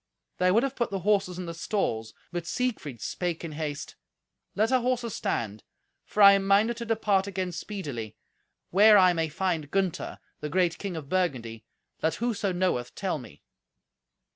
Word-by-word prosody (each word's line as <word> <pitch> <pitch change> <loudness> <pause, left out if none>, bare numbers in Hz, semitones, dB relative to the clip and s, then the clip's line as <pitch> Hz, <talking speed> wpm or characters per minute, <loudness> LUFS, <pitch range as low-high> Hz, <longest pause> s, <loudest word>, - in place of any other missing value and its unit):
They 180 - +4
would 220 +6 +4
have 275 -1 -2
put 235 - -1
the 195 -1 -3
horses 195 -4 +2
in 180 - -4
the 170 - -5
stalls, 115 - -2 0.2
but 175 -1 -4
Siegfried 195 - -2
spake 175 -2 -3
in 165 - -5
haste, 150 -1 -5 0.6
"Let 220 +3 +2
our 255 -1 +4
horses 245 -3 -1
stand, 110 -2 -2 0.4
for 210 - +2
I 200 - +11
am 195 0 +1
minded 215 +4 +4
to 235 - -5
depart 210 -4 +1
again 185 -2 -2
speedily. 145 - -6 0.5
Where 210 +3 +7
I 185 -2 +6
may 165 -2 -1
find 160 -2 -1
Gunther, 190 -1 -1 0.2
the 150 - -4
great 175 +1 +1
king 195 -4 -4
of 150 -3 -7
Burgundy, 125 -11 -1 0.4
let 160 0 +1
whoso 220 -4 -1
knoweth 175 -9 -1
tell 190 -6 -2
me." 95 - -13
185 Hz, 170 wpm, -27 LUFS, 155-205 Hz, 0.6 s, I